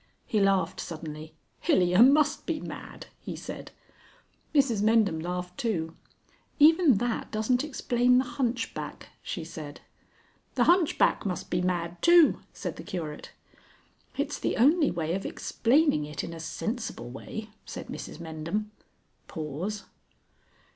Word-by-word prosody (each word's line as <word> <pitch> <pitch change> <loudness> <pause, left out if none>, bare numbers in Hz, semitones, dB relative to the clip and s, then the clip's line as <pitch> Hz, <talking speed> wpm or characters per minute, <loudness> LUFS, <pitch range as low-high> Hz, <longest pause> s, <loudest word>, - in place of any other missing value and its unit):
He 215 - 0
laughed 195 -1 +2
suddenly. 155 -1 -7 0.2
"Hilyer 180 +2 +3
must 290 +3 +4
be 325 -2 -1
mad," - - -8
he - - -6
said. - - -7 0.8
Mrs 265 -8 +3
Mendham 215 -6 +3
laughed 180 +1 -4
too. 165 -8 -1 0.6
"Even 315 -2 +6
that 235 +3 -1
doesn't 235 +4 +1
explain 250 -4 +2
the 255 - +4
hunchback," 240 -1 -3
she 175 - -5
said. 155 -2 -8 0.8
"The - - +4
hunchback 345 -2 +3
must 185 -3 -4
be 175 - +1
mad 175 -1 -2
too," 340 -2 +6
said - - -6
the - - -7
Curate. 160 -5 -6 0.9
"It's - - -2
the - - -1
only 300 +5 +5
way 165 -1 -2
of 195 +1 -2
explaining 245 - +2
it 150 0 -5
in 170 - -6
a 165 - -8
sensible 220 - -4
way," 215 - -7
said - - -7
Mrs - - -7
Mendham. 170 +6 -4 0.6
[_Pause. 165 +7 -4
210 Hz, 130 wpm, -28 LUFS, 165-250 Hz, 0.9 s, Even